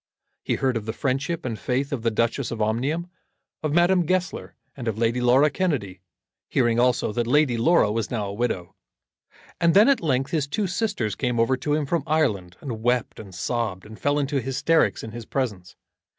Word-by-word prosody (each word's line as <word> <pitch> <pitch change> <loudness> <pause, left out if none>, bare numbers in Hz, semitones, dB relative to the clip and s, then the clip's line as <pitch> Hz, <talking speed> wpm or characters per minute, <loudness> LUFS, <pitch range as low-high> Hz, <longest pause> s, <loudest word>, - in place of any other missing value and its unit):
He - - 0
heard 130 -3 0
of 110 -1 -6
the 110 - -2
friendship 140 +5 -1
and 115 -4 -3
faith 135 +3 -1
of 130 - -2
the 115 - +1
Duchess 115 +4 0
of 115 - -5
Omnium, 135 +11 -1 0.5
of 155 -2 -1
Madame 175 +1 +3
Goesler, 185 0 -2 0.2
and 125 -4 -6
of 110 -2 -1
Lady 115 +2 +1
Laura 130 +5 +4
Kennedy, 125 - -2 0.5
hearing 120 -2 +2
also 125 -2 +2
that 120 0 -1
Lady 145 -1 +3
Laura 115 -2 +3
was 110 -1 -2
now 110 -4 -2
a 100 - -5
widow. 100 -6 -2 0.9
And 170 0 +3
then 210 +3 +7
at 275 -3 +3
length 135 -4 0
his 150 -4 0
two 200 +8 -1
sisters 180 - -1
came 125 -3 -1
over 115 +3 +3
to 145 +3 -1
him 150 -1 0
from 170 +4 0
Ireland, 105 - 0
and 120 -6 -5
wept 120 0 0
and 100 -4 -10
sobbed, 105 -1 -2
and 110 +1 -12
fell 145 0 +1
into 140 -1 0
hysterics 140 +6 +1
in 110 - -7
his 115 -1 -8
presence. 105 -9 -3
125 Hz, 195 wpm, -24 LUFS, 115-150 Hz, 0.9 s, then